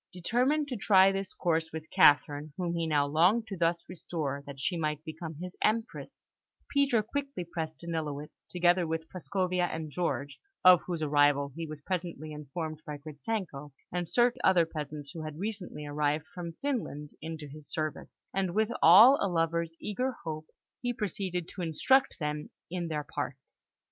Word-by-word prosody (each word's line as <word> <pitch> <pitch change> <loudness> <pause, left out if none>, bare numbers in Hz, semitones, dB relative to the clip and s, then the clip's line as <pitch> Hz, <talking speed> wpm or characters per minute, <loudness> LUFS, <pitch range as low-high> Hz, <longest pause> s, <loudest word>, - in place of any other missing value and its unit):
Determined 250 - +1
to 255 - -2
try 195 -1 +6
this 195 -1 -3
course 160 -2 0
with 160 0 -6
Catherine, 145 0 +4
whom 175 -2 -1
he 165 -1 -1
now 145 -2 +3
longed 175 +10 +3
to 200 -3 -6
thus 170 -1 0
restore 155 -5 -4
that 140 -1 -8
she 175 +6 0
might 155 -2 -2
become 160 0 -6
his 180 +4 -7
Empress, 225 +2 -1 0.5
Peter 275 -6 +3
quickly 275 -2 -3
pressed 160 -2 -5
Danilowitz, 155 -3 -5
together 175 0 +3
with 160 0 -3
Prascovia 185 0 -1
and 160 -2 -5
George 145 -4 -2 0.3
(of 180 -1 +9
whose 170 -3 -2
arrival 145 -1 +3
he 165 0 -4
was 155 -1 -8
presently 170 -3 -4
informed 155 +1 -5
by 150 -1 -6
Gritzenko), 150 - -5 0.2
and 175 -1 -2
certain 240 0 +3
other 180 -3 +5
peasants 150 -2 -6
who 165 - -7
had 155 -1 -6
recently 195 -6 -4
arrived 150 +1 0
from 170 -2 -6
Finland, 215 - -2
into 160 -1 -6
his 150 +1 -11
service; 155 -1 -4
and 190 -2 -1
with 220 +1 +2
all 220 - +9
a 200 - +2
lover's 165 -1 0
eager 250 +6 -2
hope, 155 -1 -5 0.3
he 245 0 -1
proceeded 185 -5 -3
to 185 - -7
instruct 260 - +3
them 150 -1 -3 0.2
in 175 -1 -2
their 150 -2 -2
parts. 135 -2 -7
165 Hz, 165 wpm, -30 LUFS, 150-190 Hz, 0.5 s, of